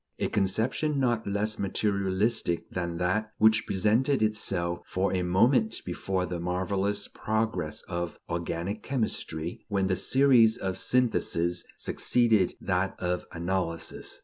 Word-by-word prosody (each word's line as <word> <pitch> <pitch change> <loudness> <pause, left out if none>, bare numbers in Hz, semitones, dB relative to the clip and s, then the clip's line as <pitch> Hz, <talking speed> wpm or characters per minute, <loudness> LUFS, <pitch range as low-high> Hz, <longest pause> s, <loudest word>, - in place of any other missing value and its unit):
A - - -1
conception 115 +9 0
not 120 -4 0
less 105 +2 -1
materialistic 100 -1 0
than 85 -2 -3
that 100 +5 0
which 110 0 +4
presented 110 +7 +2
itself 90 -5 0
for 95 +2 0
a 90 - +1
moment 110 +6 +2
before 95 +1 -2
the 90 -1 -4
marvelous 95 +3 -1
progress 110 -8 -2
of 85 -1 -4
organic 85 +4 -3
chemistry, 90 - -3
when 100 -2 0
the 95 -1 +1
series 125 -2 +4
of 95 -1 -3
syntheses 90 -9 +1
succeeded 115 -6 +2
that 95 0 -1
of 90 0 -2
analyses. 85 -1 -3
100 Hz, 120 wpm, -28 LUFS, 90-110 Hz, -, which